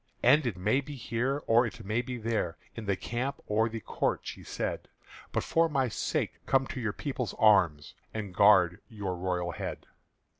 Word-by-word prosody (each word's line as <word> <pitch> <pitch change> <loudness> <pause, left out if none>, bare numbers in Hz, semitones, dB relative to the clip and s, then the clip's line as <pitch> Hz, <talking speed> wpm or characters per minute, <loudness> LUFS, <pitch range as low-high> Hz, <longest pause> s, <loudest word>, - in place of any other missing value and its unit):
"And 140 +2 +5
it 105 -6 -2
may 105 +9 +2
be 145 +1 -8
here 130 +3 -1
or 115 +2 +5
it 115 -1 -9
may 110 +4 +1
be 125 0 -5
there, 110 -7 -1 0.2
In 115 -3 -7
the 100 - +2
camp 130 +8 -3
or 110 +2 +2
the 115 0 -5
court," - - -1
she - - -7
said: - - -3 0.4
"But - - 0
for 165 0 +2
my 135 -4 +1
sake - - -2
come 135 0 +3
to - - -4
your 110 -3 0
people's 130 0 -4
arms 95 -10 +4 0.2
And 105 -4 -5
guard 95 -2 +5
your 100 -5 -4
royal 90 -1 -1
head." - - -5
115 Hz, 185 wpm, -30 LUFS, 100-125 Hz, 0.4 s, And